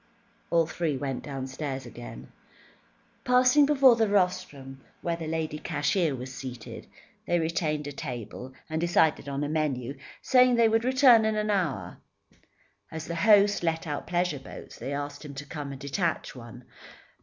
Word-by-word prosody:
All 165 -1 +3
three 160 -3 -2
went 135 -2 -3
downstairs 135 0 -5
again. - - -10 0.9
Passing 255 +3 +5
before 270 -4 +6
the 225 -1 +2
rostrum 180 -9 -1 0.2
where 170 -1 0
the 165 -1 -6
lady 155 -1 -3
cashier 155 0 0
was 130 +1 -7
seated, 125 -3 -8 0.4
they 175 - +2
retained 160 -2 -1
a 145 - -5
table, 125 -1 -7 0.2
and 160 0 -2
decided 160 -4 +2
on 140 +1 -2
a - - -1
menu, 145 -4 -2 0.2
saying 250 -1 +4
they 235 -1 +5
would 225 +1 +2
return 260 -3 +6
in 220 0 +1
an 215 0 0
hour. 140 - -2 0.9
As 160 0 -6
the 170 - -5
host 205 +3 +4
let 165 -1 -1
out 145 -2 -4
pleasure 175 -4 0
boats, 135 - -11
they 135 - -5
asked 145 +1 -5
him 145 -2 -9
to 140 +1 -7
come 145 -2 -6
and 135 - -8
detach 150 +3 -2
one. 120 0 -11
155 Hz, 160 wpm, -27 LUFS, 135-185 Hz, 0.9 s, before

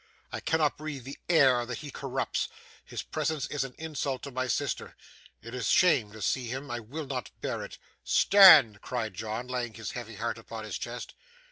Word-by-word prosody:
I - - -4
cannot 155 -3 +1
breathe 150 -4 -6
the 135 +3 -9
air 135 -7 +5
that 120 -1 -5
he 145 -2 -8
corrupts. - - -2 0.3
His - - -6
presence 155 -4 -2
is 145 -2 -1
an 135 -2 -8
insult 145 -5 -3
to 140 - -6
my 130 0 -2
sister. - - -2 0.5
It 115 +2 -9
is 125 -5 -2
shame 145 - +4
to 110 - -7
see 130 -2 0
him. 130 +3 -5
I 120 - -2
will 140 +8 -6
not 125 -9 -4
bear - - -3
it.' - - -9 0.3
'Stand!' 155 - +7
cried 115 -5 -3
John, 110 +5 -4
laying 125 -3 -3
his 110 - -5
heavy 120 -4 -7
hand 115 +2 -3
upon 115 0 -8
his 105 -3 -5
chest. 120 +1 -6
125 Hz, 195 wpm, -29 LUFS, 115-145 Hz, 0.5 s, Stand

